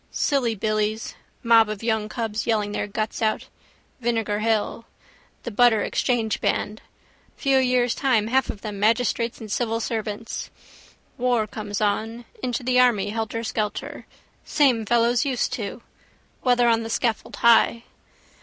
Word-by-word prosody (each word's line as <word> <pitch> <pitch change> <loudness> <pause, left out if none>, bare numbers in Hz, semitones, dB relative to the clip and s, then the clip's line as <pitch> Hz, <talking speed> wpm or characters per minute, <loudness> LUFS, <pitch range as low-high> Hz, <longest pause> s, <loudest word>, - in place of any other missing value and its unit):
Silly 250 -6 0
billies: 215 +1 -1 0.3
mob 230 -2 +5
of 215 0 -5
young 220 -2 0
cubs 225 -2 -3
yelling 210 -3 +1
their 205 - -2
guts 215 +2 -3
out. 215 -1 0 0.5
Vinegar 225 -4 -1
hill. 225 +1 -1 0.6
The 240 - -5
Butter 225 0 +4
exchange 230 -4 0
band. 215 +1 -1 0.6
Few 270 -2 +3
years' 250 -2 +2
time 250 -6 +1
half 260 +4 +1
of 200 - -6
them 210 -2 -6
magistrates 230 +2 +1
and 220 -3 -8
civil 230 0 0
servants. 220 -1 -4 0.7
War 245 -3 +2
comes 210 -1 -5
on: 225 +3 -1 0.2
into 245 0 -2
the 250 0 +2
army 210 -5 +3
helterskelter: 220 -1 -3 0.4
same 250 -7 +2
fellows 240 +2 +3
used 255 -3 -1
to. 230 -1 -5 0.6
Whether 245 -1 +3
on 230 -1 +3
the 225 - -5
scaffold 230 -1 -1
high. 235 0 +4
225 Hz, 135 wpm, -24 LUFS, 215-240 Hz, 0.7 s, mob